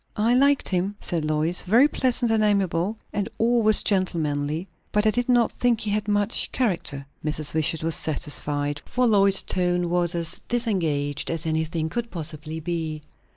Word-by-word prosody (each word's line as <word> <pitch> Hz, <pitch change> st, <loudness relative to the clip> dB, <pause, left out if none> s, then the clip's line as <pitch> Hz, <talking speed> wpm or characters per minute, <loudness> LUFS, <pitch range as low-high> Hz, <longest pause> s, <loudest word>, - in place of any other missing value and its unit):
"I 225 Hz, +3 st, +3 dB
liked 280 Hz, +2 st, +3 dB
him," 190 Hz, +2 st, -1 dB
said 165 Hz, -3 st, -3 dB
Lois. 155 Hz, +3 st, +1 dB
"Very 235 Hz, +9 st, +5 dB
pleasant 250 Hz, -4 st, 0 dB
and 220 Hz, -1 st, +3 dB
amiable, 200 Hz, -1 st, +1 dB, 0.2 s
and 205 Hz, +1 st, -2 dB
always 225 Hz, -2 st, +3 dB
gentlemanly. 160 Hz, -5 st, 0 dB, 0.3 s
But 210 Hz, +1 st, +1 dB
I 215 Hz, -, +5 dB
did 245 Hz, +2 st, -1 dB
not 240 Hz, -2 st, +3 dB
think 240 Hz, -2 st, +1 dB
he 210 Hz, -, -1 dB
had 210 Hz, 0 st, -1 dB
much 205 Hz, +1 st, +1 dB
character." 170 Hz, -, -1 dB, 0.2 s
Mrs. 155 Hz, 0 st, -1 dB
Wishart 160 Hz, 0 st, 0 dB
was 165 Hz, 0 st, 0 dB
satisfied; 145 Hz, -2 st, -2 dB
for 250 Hz, 0 st, +1 dB
Lois's 200 Hz, -4 st, +4 dB
tone 175 Hz, -1 st, 0 dB
was 175 Hz, 0 st, +1 dB
as 170 Hz, -2 st, -4 dB
disengaged 165 Hz, -, -1 dB
as 165 Hz, 0 st, -2 dB
anything 160 Hz, 0 st, -1 dB
could 235 Hz, +7 st, -3 dB
possibly 155 Hz, -2 st, -5 dB
be. 160 Hz, -2 st, -3 dB
180 Hz, 160 wpm, -24 LUFS, 155-215 Hz, 0.3 s, Very